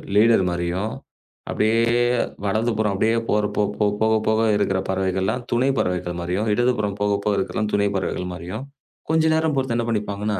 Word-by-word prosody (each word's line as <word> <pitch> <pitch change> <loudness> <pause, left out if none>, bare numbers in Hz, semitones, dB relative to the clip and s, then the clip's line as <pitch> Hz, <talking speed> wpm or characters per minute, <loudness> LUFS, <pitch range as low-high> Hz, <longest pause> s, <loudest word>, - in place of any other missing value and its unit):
Leader 110 -1 +5
மாரியும். 85 +5 -2 0.6
அப்படியே 110 +2 +2 0.7
வடக்கப்புறம் 110 0 0
அப்படியே 110 +4 +1
போகப்போக 105 +1 +1 0.2
இருக்குற 95 -2 +1
பறவைகள்லாம் 95 +5 -1
துணை 120 +3 +2
பறவைகள் 90 -1 -1
மாரியும் 90 +5 -2
இடதுபுறம் 110 -4 0
போகப்போக 105 0 +1
இருக்கறது 95 - -2
எல்லாம் 105 -1 0
துணை 100 0 +2
பறவைகள் 90 -1 -2
மாரியும் 90 +7 -6 0.5
கொஞ்ச 160 0 +3
நேரம் 160 -1 +1
போச்சுட்டு 130 -3 0
என்ன 120 0 0
பண்ணிப்பாங்கன்னா 105 -1 -2
105 Hz, 135 wpm, -22 LUFS, 95-110 Hz, 0.7 s, Leader